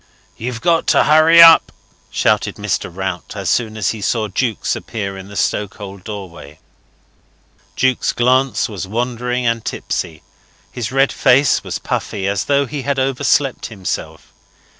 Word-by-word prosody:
"You've 120 0 -5
got 170 -1 +1
to - - +4
hurry 160 +2 +7
up," 165 -1 +7 0.4
shouted - - 0
Mr. - - -2
Rout, 95 -1 -5
as - - -2
soon 110 -3 -1
as 105 - 0
he 110 - -7
saw 110 +1 0
Jukes 115 +2 -1
appear 100 -3 -5
in 95 0 -9
the 100 - -12
stokehold 100 -2 -3
doorway. 90 -8 -9 1.2
Jukes' 130 -1 +1
glance 130 +2 +1
was 100 -3 -6
wandering 125 +3 -2
and 115 -1 0
tipsy; 80 -1 -4 0.5
his 120 -2 -5
red 135 +1 +2
face 130 0 +3
was - - -4
puffy, 100 -2 -3
as 100 -1 -1
though 140 0 +2
he 140 +2 -5
had 140 +1 -2
overslept 135 0 0
himself. 100 -5 -6
115 Hz, 145 wpm, -18 LUFS, 100-130 Hz, 1.2 s, hurry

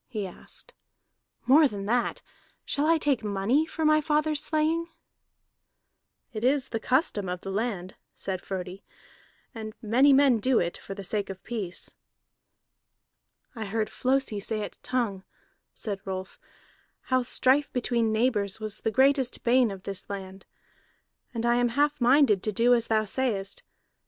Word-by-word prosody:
he 215 -5 -4
asked. 190 - -7 0.7
"More 295 +4 +6
than 200 -5 -6
that, 240 +3 0 0.4
shall 290 +1 0
I 330 0 +5
take 285 -6 +1
money 210 +10 +1
for 320 - -3
my 305 0 +5
father's 300 0 +1
slaying?" 320 +2 +1 1.5
"It 215 0 -5
is 270 +1 +2
the 225 - -2
custom 235 - 0
of 180 0 -4
the 195 - -5
land," 195 -3 -3 0.2
said 185 -2 -4
Frodi, 190 0 -6 0.7
"and 220 -2 -7
many 245 +5 +4
men 270 -4 +5
do 255 +3 +2
it 175 0 0
for 195 - -8
the 200 - -7
sake 200 +1 -2
of 190 -1 -8
peace." 205 -7 -5 1.6
"I 220 -2 -4
heard 215 +2 -2
Flosi 260 -5 0
say 215 +1 -2
at - - -9
Tongue," 225 -7 -2 0.5
said 200 -3 -5
Rolf, 190 -1 -6 0.7
"how 255 - +4
strife 260 +3 +2
between 235 -2 0
neighbors 220 -3 0
was 215 -1 -5
the - - -1
greatest 265 +2 +2
bane 245 0 +4
of 195 -2 -8
this 195 -2 -4
land. 190 -1 -7 0.8
And 230 -1 -3
I 240 0 +3
am 245 0 +2
half 290 +3 +1
minded 245 -5 +5
to 215 - -1
do 235 +4 +4
as 235 -1 +2
thou 220 -1 +2
sayest. 210 -4 -2
230 Hz, 150 wpm, -27 LUFS, 200-265 Hz, 1.6 s, More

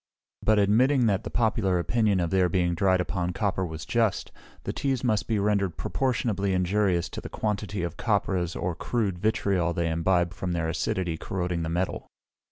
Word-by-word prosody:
But 110 0 +3
admitting 120 +6 +4
that 100 -3 +1
the - - -5
popular 110 -5 +1
opinion 105 +2 +1
of 85 -2 -1
their 95 -2 +3
being 85 0 +1
dried 95 +1 +2
upon 90 -1 -2
copper 95 0 -1
was 80 -3 -5
just, 115 -4 0 0.3
the - - -3
teas 135 -3 -1
must 110 -4 +1
be 110 - +1
rendered 100 -3 0
proportionably 110 -7 0
injurious 90 -1 +1
to - - -6
the - - -8
quantity 105 -3 -2
of 85 -1 -4
copperas 95 -5 0
or 90 0 -2
crude 100 0 -2
vitriol 95 -4 +1
they 85 -1 -1
imbibe 85 +1 +1
from 90 0 -3
their 85 -1 -1
acidity 85 +1 -1
corroding 90 -1 -3
the 80 - -2
metal. 90 +3 -2
95 Hz, 175 wpm, -27 LUFS, 85-105 Hz, 0.3 s, admitting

